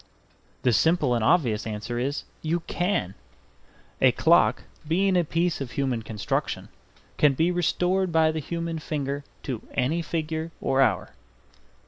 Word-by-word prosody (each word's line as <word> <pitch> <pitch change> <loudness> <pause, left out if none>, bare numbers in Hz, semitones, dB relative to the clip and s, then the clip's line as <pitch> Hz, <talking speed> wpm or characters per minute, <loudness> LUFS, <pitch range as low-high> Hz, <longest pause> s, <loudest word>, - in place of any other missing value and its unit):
The 125 - +3
simple 155 0 +3
and 115 -2 0
obvious 120 -8 +2
answer 110 +3 -4
is 140 +4 -2 0.2
"You 165 +2 -1
can." 175 - -1 0.9
A - - +6
clock, - - +3 0.2
being 190 +4 +2
a 175 - +4
piece 165 0 0
of 125 -3 -5
human 130 -4 -1
construction, 110 -2 -3 0.5
can 145 -2 +5
be 165 +6 +2
restored 180 +1 +1
by 160 -1 +4
the 160 - -3
human 165 +2 -4
finger 145 -2 -3 0.2
to 125 -5 -4
any 140 +6 +1
figure 160 0 -3
or 135 0 +1
hour. 135 - +1
155 Hz, 140 wpm, -26 LUFS, 130-170 Hz, 0.9 s, A